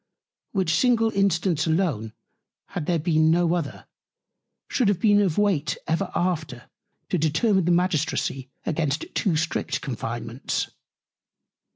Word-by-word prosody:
Which 185 -5 +1
single 225 +3 +3
Instance 180 -5 +1
alone, 155 - 0 0.6
had 165 -4 -4
there 175 - +2
been 155 -1 +2
no 170 +1 +3
other, 165 -5 -3 0.8
should 245 - +1
have 200 -3 +2
been 205 0 +4
of 185 -6 0
Weight 195 -8 +1
ever 175 +4 0
after 160 -9 -2 0.4
to 180 - 0
determine 170 +5 +2
the 175 - +3
Magistracy 160 -6 0 0.2
against 155 -2 -1
too 185 -5 +1
strict 165 +2 -1
Confinements. 120 -2 -3
165 Hz, 125 wpm, -25 LUFS, 155-190 Hz, 0.8 s, been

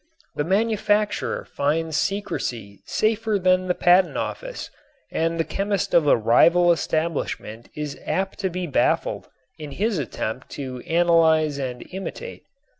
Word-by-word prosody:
The 145 - -1
manufacturer 210 +2 0
finds 155 +2 -1
secrecy 125 - -3
safer 220 -1 +1
than 185 0 +2
the 180 - +1
patent 180 +1 +4
office - - -5 0.4
and 165 +1 -1
the - - +3
chemist 200 +2 -2
of 160 -3 +4
a - - +5
rival 170 +11 +5
establishment 155 -9 -2
is 150 -2 -5
apt 190 0 -2
to 190 - 0
be 180 0 -3
baffled 150 - 0 0.3
in 150 -2 -7
his 210 0 0
attempt 125 -2 -4
to 130 -3 -5
analyze 160 -3 +3
and 125 -2 -5
imitate. 195 - -6
170 Hz, 130 wpm, -23 LUFS, 145-195 Hz, 0.4 s, a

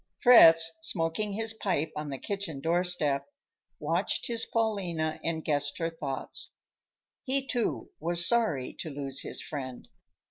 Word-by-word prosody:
Fritz, 165 -10 +8
smoking 195 +2 -1
his 225 +2 0
pipe 175 -8 -1
on 150 -1 -4
the 135 - -4
kitchen 195 -4 -4
doorstep, 160 -3 0 0.5
watched 165 +5 0
his 230 -1 0
Paulina 180 -9 -1
and 160 -1 -2
guessed 145 -1 0
her 165 0 -2
thoughts. 140 -5 -4 0.7
He, 270 0 0
too, 225 - -2
was 170 +2 +3
sorry 220 - +1
to 160 - -4
lose 140 -2 -1
his - - -4
friend. 130 -4 -7
165 Hz, 135 wpm, -29 LUFS, 145-205 Hz, 0.7 s, Fritz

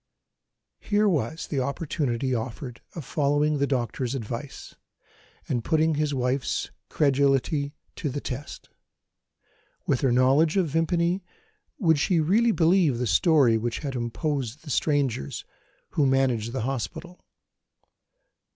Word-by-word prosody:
Here 210 0 +1
was 160 - -1
the 140 - -2
opportunity 135 -2 -1
offered 120 +1 -5
of 160 -6 -6
following 145 0 +1
the 140 - +2
doctor's 125 0 -2
advice, 120 +3 -6 0.7
and 120 -2 -1
putting 160 +2 +2
his 150 0 0
wife's 130 0 -1 0.2
credulity 140 +1 +1 0.2
to 150 - -2
the 140 +2 -3
test. 135 +1 -7 1.2
With 135 - +1
her 135 - +2
knowledge 135 +8 +3
of 180 -5 +2
Vimpany, 170 +4 +1 0.5
would 160 - +3
she 170 +4 +2
really 215 +9 +3
believe 165 - +3
the 125 - -1
story 120 - +4
which 120 +1 -2
had 135 - -3
imposed 130 +1 -2
on - - -28
the 150 - -7
strangers 135 - 0 0.5
who 145 -3 +2
managed 130 -4 +1
the 130 - -3
hospital? 145 +8 -5
140 Hz, 125 wpm, -26 LUFS, 125-160 Hz, 1.2 s, story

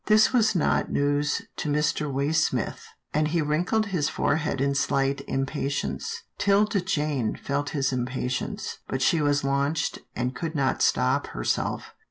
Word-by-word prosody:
This 215 +3 +5
was 220 -4 +3
not 170 - +1
news 145 +1 +1
to - - -2
Mr. 150 0 0
Waysmith, 145 +4 0 0.3
and 155 0 +2
he 170 +2 0
wrinkled 175 +9 +1
his 155 -4 +1
forehead 150 -2 0
in 140 +1 +2
slight 140 0 +1
impatience. 145 - -2 0.2
'Tilda 205 0 +3
Jane 150 - -1
felt 145 +1 -2
his 135 -2 0
impatience, 125 0 -3
but 130 0 -1
she 165 0 +3
was 145 -1 +2
launched, 140 +3 0 0.2
and 125 +1 -1
could 160 +4 -4
not 135 -3 +1
stop 65 - +2
herself. - - -2
145 Hz, 145 wpm, -26 LUFS, 135-165 Hz, 0.3 s, This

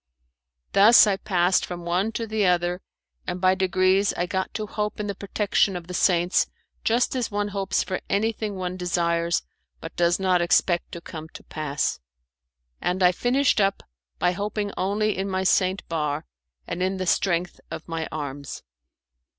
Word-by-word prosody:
Thus 210 +5 +8
I 205 -2 +2
passed 180 -2 +2
from 175 -1 -6
one 180 +5 0
to 230 - -2
the 215 -1 -1
other, 175 0 +1 0.5
and 180 +1 -3
by 185 0 +4
degrees 190 +1 +2
I 175 - 0
got 190 +1 -2
to 215 - -2
hope 210 0 -3
in 210 - -2
the 200 - -2
protection 200 0 0
of 175 -1 -5
the 180 - -8
saints 175 -1 +2 0.4
just 240 +3 +1
as 250 -3 -1
one 205 0 -1
hopes 195 -1 -1
for 185 - -4
anything 215 0 -1
one 185 -1 -4
desires, 170 -1 0 0.4
but 165 - -9
does 175 +1 +2
not 185 -2 +2
expect 175 0 +2
to 170 - -6
come 160 -1 -8
to - - -10
pass; 145 - -2 0.8
and 180 +1 0
I 180 - +7
finished 245 +4 +2
up 195 0 +1 0.3
by 175 - +2
hoping 205 +2 -3
only 210 +3 0
in 195 +1 -2
my 190 0 -1
Saint 190 +1 +1
Bar, 150 -2 -2 0.4
and 175 - -4
in 190 +1 0
the 185 - -2
strength 175 -1 0
of - - -7
my 165 -1 -3
arms. 145 -2 -6
185 Hz, 170 wpm, -24 LUFS, 175-205 Hz, 0.8 s, Thus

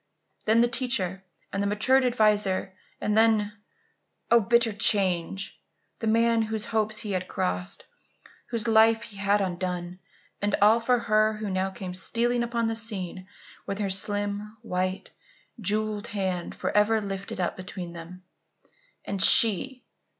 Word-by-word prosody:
Then 225 +2 +4
the 240 - +4
teacher 235 -7 -1 0.3
and 195 - -1
the 200 - 0
matured 255 +6 +2
adviser; 210 -6 +1 0.3
and 210 - -1
then 220 -2 +3 0.8
oh, 235 - +7
bitter 230 +1 +2
change! 195 -3 +1 0.4
the 225 - -3
man 230 +1 +3
whose 220 0 -2
hopes 215 -1 -1
he 210 -2 -5
had 185 -1 -2
crossed 90 0 -3 0.6
whose 230 -3 -3
life 225 0 +4
he 205 - -11
had 200 +1 +1
undone, 180 -1 -4 0.4
and 205 0 +1
all 215 +3 +5
for 245 +2 +2
her 215 -1 +2
who 215 -2 -5
now 190 +1 -1
came 185 -1 -7
stealing 235 +6 -1
upon 235 -1 -1
the 225 0 -1
scene 190 -5 -1 0.4
with 195 - -3
her 200 -2 -2
slim, 205 +2 -2
white, 185 -2 -3 0.5
jewelled 210 +1 -2
hand 190 -4 -3
forever 215 +2 +1
lifted 195 -2 -6
up 180 - -1
between 185 -2 -7
them. 175 +2 -11 0.8
And 200 -1 -3
she! 235 +6 +6
210 Hz, 145 wpm, -26 LUFS, 190-225 Hz, 0.8 s, oh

